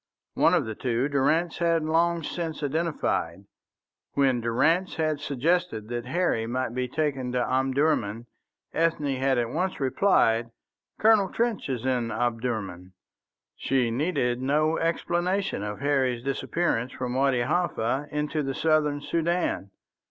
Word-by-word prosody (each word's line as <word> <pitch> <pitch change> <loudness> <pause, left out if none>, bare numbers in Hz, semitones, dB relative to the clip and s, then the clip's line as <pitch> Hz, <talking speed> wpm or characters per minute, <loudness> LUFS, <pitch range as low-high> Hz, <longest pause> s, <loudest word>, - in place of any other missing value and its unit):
One - - +4
of - - +1
the 110 - -4
two 120 +3 -1
Durrance 155 +5 +1
had 165 -2 +2
long 165 +1 +1
since 160 -2 -4
identified. 145 - -1 0.7
When 135 -3 +2
Durrance 160 +11 +1
had 155 -2 0
suggested 140 -6 -1
that 120 0 -4
Harry 135 -7 0
might 125 0 -2
be 125 0 -1
taken 135 -2 -2
to 125 -1 +1
Omdurman, 130 -4 +1 0.5
Ethne 155 -4 +1
had 135 0 +1
at 120 -1 0
once 180 +3 -2
replied, 130 - +2 0.5
"Colonel 215 -3 +5
Trench 230 -7 -1
is 125 -2 -3
in 125 -3 0
Omdurman." 110 -6 -3 0.6
She 130 -3 0
needed 125 -3 0
no 155 +4 +2
explanation 175 - 0
of 105 +4 -5
Harry's 130 -4 +1
disappearance 135 -2 -1
from 125 -1 -4
Wadi 130 -1 +2
Halfa 140 -2 0
into 150 +1 -2
the 135 -2 -3
southern 150 -2 +1
Soudan. 170 - -1
135 Hz, 130 wpm, -26 LUFS, 120-165 Hz, 0.7 s, Colonel